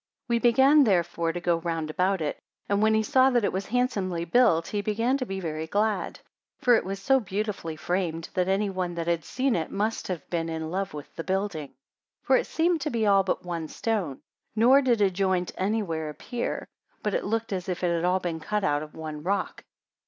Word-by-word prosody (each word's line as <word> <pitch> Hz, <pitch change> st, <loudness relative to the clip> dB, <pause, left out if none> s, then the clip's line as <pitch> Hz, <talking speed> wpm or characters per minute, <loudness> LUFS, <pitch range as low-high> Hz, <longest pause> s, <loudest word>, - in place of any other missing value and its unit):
84 -, -, +3 dB
We 235 Hz, -, +3 dB
began 275 Hz, +5 st, +6 dB
therefore 175 Hz, -6 st, +1 dB
to 175 Hz, -, -4 dB
go 175 Hz, -1 st, +1 dB
round 165 Hz, -2 st, -3 dB
about 185 Hz, +2 st, +1 dB
it; 150 Hz, -, -2 dB, 0.3 s
and 200 Hz, 0 st, +1 dB
when 220 Hz, 0 st, +4 dB
he 220 Hz, -, +2 dB
saw 260 Hz, +4 st, +4 dB
that 240 Hz, -3 st, +2 dB
it -, -, 0 dB
was 190 Hz, +1 st, -3 dB
handsomely 200 Hz, -8 st, 0 dB
built, 170 Hz, -4 st, +3 dB
he 205 Hz, -, -1 dB
began 225 Hz, +5 st, +1 dB
to 255 Hz, -, -3 dB
be 195 Hz, 0 st, -4 dB
very 160 Hz, -3 st, -4 dB
glad; 210 Hz, +4 st, 0 dB, 0.4 s
for 245 Hz, -, +4 dB
it 230 Hz, -, +4 dB
was 195 Hz, +1 st, -4 dB
so 265 Hz, +7 st, +3 dB
beautifully 200 Hz, -5 st, -3 dB
framed, 165 Hz, -1 st, -2 dB
that 180 Hz, 0 st, +1 dB
any 195 Hz, +2 st, +1 dB
one 180 Hz, -2 st, -3 dB
that 170 Hz, -1 st, -3 dB
had 170 Hz, -1 st, 0 dB
seen 260 Hz, -1 st, 0 dB
it 160 Hz, -2 st, -2 dB
must 215 Hz, +3 st, -2 dB
have 175 Hz, -6 st, -5 dB
been 165 Hz, -1 st, -1 dB
in 160 Hz, 0 st, -4 dB
love 190 Hz, -3 st, -2 dB
with 145 Hz, -, -9 dB
the 165 Hz, -, -4 dB
building. 190 Hz, -5 st, -2 dB
85 -, -, -31 dB, 0.5 s
For 265 Hz, -, +4 dB
it -, -, -1 dB
seemed 330 Hz, 0 st, +1 dB
to 300 Hz, -, -1 dB
be 230 Hz, -5 st, 0 dB
all 200 Hz, -1 st, +5 dB
but 185 Hz, -1 st, -2 dB
one 170 Hz, -2 st, -3 dB
stone, 190 Hz, -, -2 dB, 0.3 s
nor 250 Hz, +5 st, +6 dB
did 240 Hz, -5 st, +2 dB
a 195 Hz, -2 st, +4 dB
joint 185 Hz, -1 st, 0 dB
any 210 Hz, +4 st, 0 dB
where 160 Hz, -4 st, -3 dB
appear; 240 Hz, +10 st, -4 dB, 0.4 s
but 210 Hz, -, -1 dB
it -, -, 0 dB
looked 225 Hz, +1 st, -2 dB
as 185 Hz, 0 st, -3 dB
if 180 Hz, 0 st, -3 dB
it 175 Hz, -1 st, +2 dB
had 165 Hz, -, -1 dB
all 180 Hz, +1 st, +2 dB
been 170 Hz, -3 st, -3 dB
cut 210 Hz, +6 st, -2 dB
out 145 Hz, -2 st, +1 dB
of 155 Hz, 0 st, -9 dB
one 155 Hz, -2 st, -6 dB
rock. 195 Hz, +5 st, -2 dB
190 Hz, 225 wpm, -27 LUFS, 165-220 Hz, 0.5 s, began